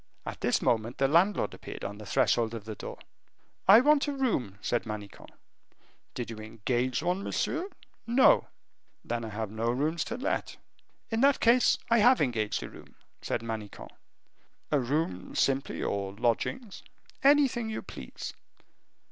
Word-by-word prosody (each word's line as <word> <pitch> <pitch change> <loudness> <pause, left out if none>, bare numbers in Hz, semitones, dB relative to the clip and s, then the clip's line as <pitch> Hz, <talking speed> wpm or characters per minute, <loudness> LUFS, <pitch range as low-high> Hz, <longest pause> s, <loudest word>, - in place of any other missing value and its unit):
At - - -6
this - - +1
moment 115 +1 0
the 135 - +3
landlord 175 +8 +2
appeared - - -9
on 105 +1 -6
the 105 - -9
threshold 115 -1 +2
of 110 -2 -8
the 110 - -5
door. - - -8 0.7
"I 205 +5 +9
want 295 +1 +4
a - - 0
room," 215 - -1
said 120 +2 -1
Manicamp. 105 -2 -8 0.9
"Did 120 -1 -4
you 115 - -7
engage 120 +5 -2
one, 180 +2 0
monsieur?" 345 - -2 0.4
"No." 245 +3 +5 0.6
"Then 120 0 -2
I 110 - -5
have 105 -1 -4
no 110 +2 -1
rooms 155 +7 0
to 235 - -4
let." 260 - -2 0.5
"In 225 +1 0
that 280 0 +4
case, 240 +2 +4
I 230 - +5
have 245 +4 +6
engaged 115 -6 0
a - - -7
room," - - -15 0.3
said - - -2
Manicamp. 110 -3 -6 0.8
"A 150 - +3
room 125 - -2
simply, 135 0 0
or 100 -1 -2
lodgings?" 125 - -2 0.4
"Anything 270 -5 +4
you 220 - -4
please." - - -8
130 Hz, 155 wpm, -29 LUFS, -, 0.9 s, I